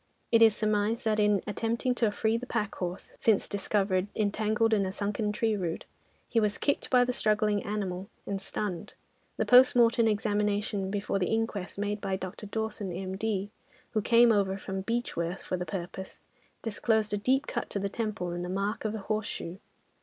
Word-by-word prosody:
It 230 -1 +5
is 220 -2 +7
surmised 215 +2 0
that 215 -1 +2
in 210 -2 +3
attempting 230 +4 -1
to 235 -3 +2
free 220 +2 +1
the 245 +2 -3
pack 210 -4 -1
horse, 180 +1 -5
since 220 -3 +3
discovered 195 -1 0
entangled 215 +2 +1
in 205 -2 +3
a 190 - -2
sunken 210 +1 -1
tree 220 +1 +1
root, 175 -4 -3 0.4
he 230 - +2
was 210 -2 +1
kicked 285 - 0
by 250 -1 +5
the 250 - -1
struggling 210 -2 +2
animal 195 -2 -3 0.2
and 195 -1 -3
stunned; 190 -3 -4 0.4
the - - +1
post 250 +1 +7
mortem 235 -1 +5
examination 205 -2 0
before 200 0 -1
the 180 - +1
inquest, 220 -5 -2
made 205 0 -2
by 195 -2 -1
Dr. 190 +2 -6
Dawson, 215 -2 -3
M.D., 195 +3 -3 0.4
who 215 - +1
came 235 +2 +6
over 195 -2 +2
from 190 0 -4
Beechworth 195 -5 -2
for - - -2
the 180 -1 -4
purpose, 190 +2 -6 0.4
disclosed 220 -1 0
a - - +2
deep 265 +7 +2
cut - - -4
on 200 - 0
the - - +1
temple 205 -4 -3
and 175 0 -3
the 180 - -4
mark 200 +3 -2
of 215 0 -1
a 215 - -5
horseshoe. 205 -4 -3
210 Hz, 185 wpm, -29 LUFS, 195-220 Hz, 0.4 s, is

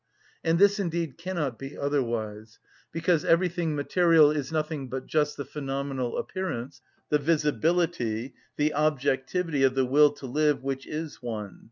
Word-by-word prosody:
And 165 0 +2
this 200 +2 +5
indeed 170 -5 -2
cannot 165 -10 -3
be 135 +1 -8
otherwise, 115 -6 -2 0.3
because 165 -1 +1
everything 170 -2 +1
material 160 +1 +4
is 145 -2 -3
nothing 155 -4 -2
but 130 +1 -4
just 150 -1 0
the 140 - -4
phenomenal 135 -2 -3
appearance, 135 -8 -4 0.3
the 150 - +3
visibility, 150 -6 0 0.2
the 150 +1 +1
objectivity 150 +2 0
of 135 -1 +4
the 135 -1 +2
will 145 +3 +5
to 140 -1 -10
live 145 +1 +1
which 135 0 -3
is 155 -1 -5
one. 105 -6 -5
145 Hz, 145 wpm, -27 LUFS, 130-165 Hz, 0.3 s, this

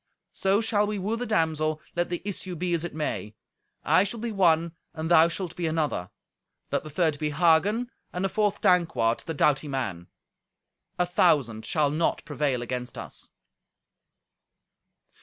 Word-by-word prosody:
So 195 +2 +2
shall 210 -2 +2
we 210 0 -2
woo 200 +4 -1
the 245 +1 -4
damsel, 155 -5 +1 0.2
let 175 0 0
the 175 - -4
issue 185 -2 -3
be 175 +1 -2
as 170 -1 0
it 175 - -5
may. 105 -9 -3 0.5
I 185 - +4
shall 210 +3 -4
be 235 +1 -3
one, 170 -4 +3 0.2
and 160 +1 -3
thou 165 -1 +7
shalt 175 0 -4
be 175 -2 -2
another. 150 - -1 0.6
Let - - 0
the 155 - -8
third 155 -1 0
be 150 - 0
Hagen, 175 - +2 0.2
and 180 +2 -2
the - - +1
fourth 205 0 0
Dankwart, 165 - +3
the 165 - -3
doughty 145 +1 +2
man. 110 -11 -3 0.9
A 180 - +2
thousand 135 -10 +2
shall 150 -3 +2
not 160 +3 0
prevail 145 -5 -1
against 125 0 -5
us." - - -9
165 Hz, 160 wpm, -26 LUFS, 145-185 Hz, 0.9 s, thou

